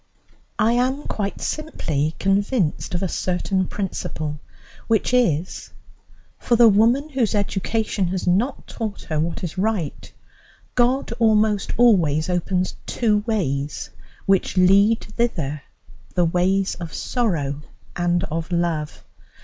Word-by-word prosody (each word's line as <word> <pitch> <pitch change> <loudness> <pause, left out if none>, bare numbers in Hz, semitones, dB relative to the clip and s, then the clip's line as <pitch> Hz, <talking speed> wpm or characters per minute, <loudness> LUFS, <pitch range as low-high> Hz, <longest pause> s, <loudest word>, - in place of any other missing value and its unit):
I 225 +1 +3
am 260 +4 +1
quite 200 -2 -4
simply 155 - -2
convinced 195 - 0
of 175 - -2
a - - +1
certain 185 +1 -1
principle, 155 -6 -4 0.5
which 225 +2 +1
is: 185 -10 +1 0.7
For 240 - +2
the 235 0 +7
woman 230 +8 +3
whose 255 -7 0
education 205 0 -1
has 185 +1 -3
not 205 +10 +1
taught 215 -3 -5
her 155 -1 -2
what 165 +4 -2
is 175 +1 -4
right, 195 -7 -2 0.6
God 250 +2 +2
almost 215 -3 +2
always 180 -9 +3
opens 180 +1 -1
two 215 -3 +1
ways 145 -10 -2 0.3
which 195 0 +1
lead 200 +5 +5
thither 170 - -2 0.5
the 175 -1 +3
ways 185 +3 +1
of 170 -2 -7
sorrow 155 - -1 0.3
and 175 0 +1
of 165 +2 -4
love. 170 -3 -1
195 Hz, 120 wpm, -22 LUFS, 170-225 Hz, 0.7 s, the